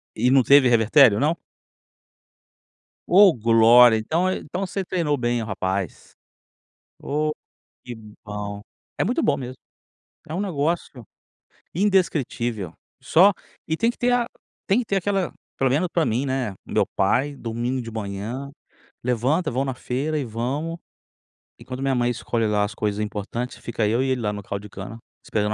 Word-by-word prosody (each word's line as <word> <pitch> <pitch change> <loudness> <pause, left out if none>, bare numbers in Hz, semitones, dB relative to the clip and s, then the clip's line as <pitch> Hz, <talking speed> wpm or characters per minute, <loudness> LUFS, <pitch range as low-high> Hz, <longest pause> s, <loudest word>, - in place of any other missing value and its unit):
E 125 +3 +2
não 135 -1 +5
teve 140 0 +6
revertério 115 0 +5
não? 155 +4 +2 1.7
Oh, 190 0 +7
glória! 115 +1 +6
Então 165 +12 0
é 185 - 0
então 180 +5 -6
você 190 +1 -3
treinou 165 -6 0
bem 120 -2 -1
o - - -3
rapaz. 95 -2 -3 0.9
Oh, 150 +1 -1 0.5
que 125 - -7 0.3
bom. 105 -1 -5 0.4
É - - +1
muito 250 - 0
bom - - +2
mesmo. 130 0 -6 0.7
É 155 - -6
um 180 - -2
negócio 155 - -2 0.7
indescritível. 140 - 0 0.3
Só 190 +5 +5 0.4
e 160 0 -1
tem 230 - +2
que - - -5
ter 245 0 +1
a 240 -1 +2 0.4
tem 205 +5 +3
que 240 - -2
ter 195 - 0
aquela, 195 -1 -1 0.2
pelo 135 -1 +2
menos 165 +6 +1
para 165 -2 +1
mim, 120 +5 0
né, 130 -5 -1 0.2
o - - -11
meu - - +2
pai, 135 +9 +1
domingo 120 +2 -3
de 115 - -7
manhã, 110 +6 -5 0.5
levanta, 125 +8 0
vão 130 +3 0
na 130 - -2
feira 140 +6 -2
e 145 - -1
vamos. 135 +9 -3 0.8
Enquanto 130 +1 -7
minha 135 -1 +1
mãe 120 -1 +1
escolhe 115 -1 -1
lá 105 -1 +1
as 105 +2 -3
coisas 105 -1 -2
importantes, 105 +4 -4
fica 115 -2 -2
eu 115 +4 +1
e 135 - 0
ele 130 -2 0
lá 105 -1 -1
no 105 - -6
caldo 100 +1 -6
de 105 - -10
cana, 100 +4 -8 0.3
esperando 105 0 -1
125 Hz, 165 wpm, -23 LUFS, 110-155 Hz, 1.7 s, Oh